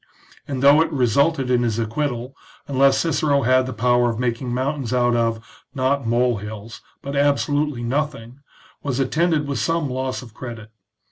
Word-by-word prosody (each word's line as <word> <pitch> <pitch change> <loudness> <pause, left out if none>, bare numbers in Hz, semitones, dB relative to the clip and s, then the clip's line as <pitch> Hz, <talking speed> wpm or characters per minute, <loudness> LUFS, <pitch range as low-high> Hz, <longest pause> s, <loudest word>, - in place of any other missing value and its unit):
and 135 -2 -3
though 145 +3 +7
it 165 - 0
resulted 135 +1 +1
in 125 -1 +3
his 115 -3 0
acquittal, 120 +2 -3 0.3
unless 135 0 +3
Cicero 145 -3 +1
had 130 +1 +3
the - - -4
power 120 +1 +2
of 115 - -3
making 120 +1 -2
mountains 130 0 -2
out 120 -1 +2
of, 115 -1 0 0.3
not 135 -1 0
mole 120 0 +2
hills, 105 +2 -8 0.2
but 140 +1 -5
absolutely 145 -1 +1
nothing, 135 -1 -3 0.4
was 140 -2 -2
attended 155 +2 +1
with 140 -3 -2
some 165 -5 0
loss 130 0 -3
of 115 -3 -14
credit. 115 -2 -9
130 Hz, 160 wpm, -21 LUFS, 120-140 Hz, 0.4 s, though